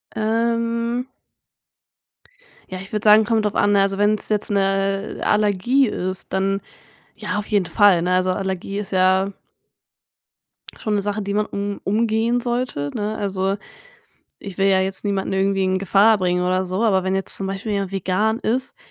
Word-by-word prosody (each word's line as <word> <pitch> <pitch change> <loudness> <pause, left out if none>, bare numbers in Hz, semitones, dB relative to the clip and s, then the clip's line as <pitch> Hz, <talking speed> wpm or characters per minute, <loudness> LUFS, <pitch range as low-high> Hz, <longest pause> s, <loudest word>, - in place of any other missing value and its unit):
Ähm 230 +2 -1 1.6
Ja, 185 0 -6
ich 190 - -11
würde 210 0 -2
sagen, 215 +1 +7
kommt 220 0 0
drauf 210 - -1
an, 205 - +3
ne, 200 - +4
also, 195 0 0
wenn's 210 +1 +1
jetzt 210 0 -1
'ne 195 0 0
Allergie 210 +6 +2
ist, 185 -2 -5
dann 195 +1 0 0.6
ja, - - -3
auf 210 - -4
jeden 205 -4 +1
Fall, 200 -2 +4
ne? 180 +1 0
Also, 185 0 +2
Allergie 190 +1 -3
ist 205 -1 -6
ja 190 +1 +2 1.5
schon 215 -1 -2
'ne 205 - +1
Sache, 205 +1 -2
die 200 0 -3
man 210 +1 +1
um 200 0 -4
umgehen 225 +3 +1
sollte, 240 - -2
ne? 215 0 -3
Also, 195 -1 -1 0.8
ich 195 -3 -9
will 195 0 +2
ja 190 -1 +4
jetzt 190 0 -2
niemanden 200 -2 -1
irgendwie 195 0 +1
in 185 0 +1
Gefahr 205 +3 +4
bringen 180 -1 0
oder 185 +1 0
so, 185 +4 -2
aber 190 -5 +2
wenn 190 0 0
jetzt 195 - +1
zum 195 - -2
Beispiel 195 +2 -4
jemand 195 -2 -2
vegan 195 +4 0
ist, 255 - -2
200 Hz, 170 wpm, -21 LUFS, 190-215 Hz, 1.6 s, sagen